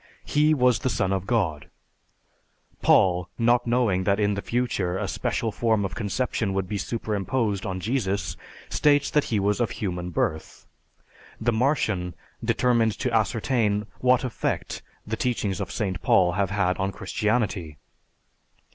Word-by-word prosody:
He 150 +1 +3
was 125 -3 +3
the 130 - -1
Son 95 -5 0
of 95 0 -2
God! 85 - 0 1.1
Paul, 90 -1 +4
not 120 +1 +3
knowing 115 -6 +2
that 100 +1 +2
in 105 -1 +2
the 100 - -3
future 100 -8 -1
a - - -2
special 115 - -1
form 110 -2 +1
of 95 - -4
conception 105 0 -1
would 95 -1 -1
be 100 +1 -3
superimposed 105 -1 -1
on 95 -1 -3
Jesus, 100 - -1 0.3
states 145 -1 +2
that 150 - +2
he 110 - 0
was 100 +2 +1
of 120 - +1
human 90 -3 -4
birth. 80 -2 -3 0.7
The 120 +1 +1
Martian 110 - 0 0.3
determined 115 -3 +2
to 125 -3 -2
ascertain 110 -1 +1
what 125 0 +3
effect 125 -3 -3 0.2
the 110 +1 -3
teachings 105 -6 -1
of 95 - -4
St. 95 -4 -2
Paul 90 -2 +4
have 95 +2 0
had 100 -2 0
on 95 +1 0
Christianity. 100 -6 -1
105 Hz, 145 wpm, -25 LUFS, 95-120 Hz, 1.1 s, Paul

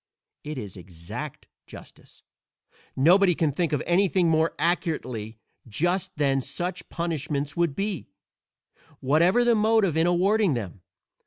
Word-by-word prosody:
It 150 -1 -6
is 100 -6 -7
exact 85 -2 -8 0.2
justice: - - -14 0.7
nobody 180 +6 +4
can 155 -2 +1
think 165 +3 -1
of 150 - -1
anything 180 -1 +2
more 160 0 +1
accurately 125 -11 -2 0.3
just 175 - 0
than 135 -2 +1
such 175 +7 -4
punishments 150 -4 -3
would 170 -5 0
be, 200 -2 -3 0.9
whatever 170 - +3
the 240 0 +4
motive 215 -5 +2
in 160 +1 +2
awarding 190 -1 +2
them. 100 -5 -6
165 Hz, 125 wpm, -25 LUFS, 135-180 Hz, 0.9 s, nobody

